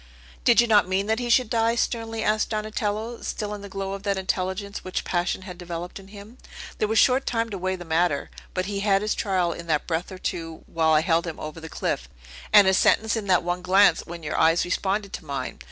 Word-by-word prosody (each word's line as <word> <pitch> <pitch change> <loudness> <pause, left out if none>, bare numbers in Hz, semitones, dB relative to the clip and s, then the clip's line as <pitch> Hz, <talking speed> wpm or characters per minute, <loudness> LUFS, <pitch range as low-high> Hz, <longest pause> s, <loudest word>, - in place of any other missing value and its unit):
"Did - - +5
you 235 - +6
not 210 -5 +4
mean 190 +1 0
that 220 +2 0
he 245 -1 -3
should 250 0 +4
die?" 230 +1 +1
sternly 225 -1 -2
asked 215 0 +1
Donatello, 215 +1 -3
still 210 -1 -4
in 205 - -7
the 200 - -9
glow 195 0 -4
of 195 - -6
that 200 -1 -1
intelligence 190 +1 -3
which 185 - -3
passion 175 +1 -1
had 180 -2 -9
developed 175 +1 -6
in 195 - -14
him. 210 +4 -13 0.4
"There 215 - +2
was 220 +1 0
short 260 +3 +4
time 230 -1 -1
to 200 - -3
weigh 185 +1 -1
the 175 -1 -9
matter; 165 -2 0 0.2
but 185 - 0
he 200 0 -3
had 200 0 +2
his 215 - 0
trial 185 -5 0
in 170 +1 -9
that 150 -2 +1
breath 170 +3 -2
or 185 - -7
two 165 -3 -5
while 160 -1 +1
I 155 - +5
held 170 0 +1
him 165 - -6
over 155 +1 -7
the 160 0 -9
cliff, - - -3 0.4
and 205 -2 +8
his 190 0 +4
sentence 220 0 +3
in 215 -3 -4
that 180 -2 +3
one 175 +1 -2
glance, 185 -1 +4
when 170 -1 -8
your 150 - -2
eyes 165 +2 +4
responded 195 +2 -1
to - - -6
mine! 140 -2 -5
195 Hz, 235 wpm, -25 LUFS, 175-215 Hz, 0.4 s, and